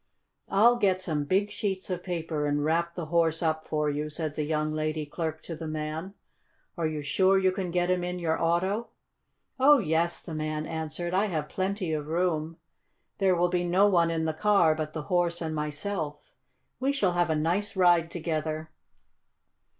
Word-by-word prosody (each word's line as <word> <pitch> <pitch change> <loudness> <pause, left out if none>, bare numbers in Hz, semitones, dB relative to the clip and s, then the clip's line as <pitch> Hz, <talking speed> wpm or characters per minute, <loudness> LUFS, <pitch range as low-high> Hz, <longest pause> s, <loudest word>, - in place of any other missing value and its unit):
"I'll 235 +5 +5
get 195 -5 +2
some 155 -5 -2
big 195 +6 +1
sheets 195 -3 -3
of 180 -1 -2
paper 165 -4 -2
and 145 0 0
wrap 170 +2 0
the 175 - -4
horse 165 0 +1
up 160 -1 -1
for 150 -1 0
you," 150 +1 -2
said 155 0 -4
the 155 - -3
young 155 0 -1
lady 155 0 -2
clerk 160 +1 -4
to 165 - -6
the 160 0 -6
man. 155 +5 -4 0.6
"Are 165 -3 0
you 155 -1 -4
sure 190 +7 +3
you 190 -1 +3
can 185 -1 -3
get 175 +1 +1
him 180 -1 +1
in 180 0 -3
your 165 -2 -1
auto?" 185 +7 +1 0.7
"Oh, 290 +3 +7
yes," 170 - 0
the 165 - -7
man 155 0 -2
answered. 160 +2 -4
"I 195 +3 +3
have 155 -7 -3
plenty 190 -3 -2
of 150 -1 -3
room. 165 -1 -1 0.6
There 190 -2 +3
will 175 +1 +2
be 175 0 0
no 180 +3 +4
one 170 -4 +3
in 165 -1 -1
the 160 - 0
car 185 -2 +4
but 155 -1 -4
the 155 - -4
horse 175 -1 +1
and 160 -2 -3
myself. 150 +1 -3 0.6
We 265 +2 +1
shall 200 -10 +2
have 175 -1 +1
a 160 - +2
nice 175 +7 0
ride 175 -3 +4
together. 155 -2 -3
165 Hz, 190 wpm, -28 LUFS, 155-185 Hz, 0.7 s, Oh